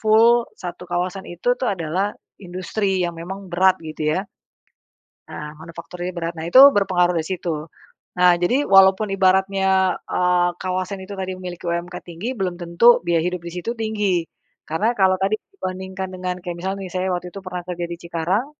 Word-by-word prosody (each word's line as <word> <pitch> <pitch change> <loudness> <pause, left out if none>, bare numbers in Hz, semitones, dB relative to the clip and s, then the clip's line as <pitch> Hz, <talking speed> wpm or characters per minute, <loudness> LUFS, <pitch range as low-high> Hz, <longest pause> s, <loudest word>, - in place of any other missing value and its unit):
full 230 +1 +7 0.3
satu 175 0 -7
kawasan 180 +2 -2
itu 175 +8 0
tuh 255 - 0
adalah 185 +2 -1 0.3
industri 185 +1 -2
yang 175 - -1
memang 190 +3 -7
berat 185 +2 +4
gitu 155 -1 -2
ya. 190 - -2 1.0
Nah, 150 0 -7
manufakturinya 170 +2 -7
berat 170 0 -3
nah, 160 - -5
itu 255 +10 +8
berpengaruh 180 -5 +2
di 160 - -3
situ. 165 -3 -3 0.5
Nah, 180 0 +6
jadi 250 +11 +2
walaupun 195 +2 +6
ibaratnya, 190 0 +2
eee, 180 -1 +2
kawasan 185 +1 -2
itu 195 +2 -8
tadi 190 0 -3
memiliki 180 -1 -8
UMK 170 +1 -3
tinggi, 175 +9 -5
belum 180 -2 -1
tentu 175 +8 +5
biaya 170 -1 +2
hidup 180 0 -2
di 170 - -6
situ 180 +6 -3
tinggi. 210 -6 0 0.4
Karena 210 +10 +1
kalau 190 -1 +4
tadi 195 +3 +1 0.2
dibandingkan 190 - -5
dengan 180 0 -3
kayak 175 -2 -4
misalnya 190 +2 -3
nih, 180 - -9
saya 185 0 -1
waktu 180 0 -3
itu 195 - -6
pernah 180 -1 -5
kerja 175 -1 -3
di 170 - -5
Cikarang, 170 +6 -1
185 Hz, 170 wpm, -22 LUFS, 175-195 Hz, 1.0 s, itu